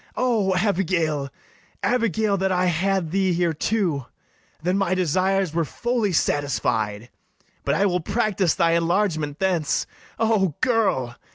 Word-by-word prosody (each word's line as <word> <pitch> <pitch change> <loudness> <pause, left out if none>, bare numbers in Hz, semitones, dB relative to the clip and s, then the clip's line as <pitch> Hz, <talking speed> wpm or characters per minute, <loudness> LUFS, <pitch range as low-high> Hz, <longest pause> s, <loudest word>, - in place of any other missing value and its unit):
O 220 -7 +1
Abigail, 170 -7 0 0.5
Abigail, 220 -4 +1
that 190 0 0
I 180 0 +2
had 180 0 0
thee 190 -1 +1
here 170 -1 +1
too! 165 - -1 0.5
Then 180 +3 0
my 195 -2 +1
desires 185 +1 +1
were 170 0 +1
fully 235 - -1
satisfied: 120 -8 -1 0.5
But - - +1
I 200 - +2
will 180 -2 +1
practice 200 -2 0
thy 170 -2 +2
enlargement 165 -3 0
thence: 180 -6 0 0.3
O 215 -8 +1
girl! 205 - +1
185 Hz, 125 wpm, -23 LUFS, 160-200 Hz, 0.5 s, I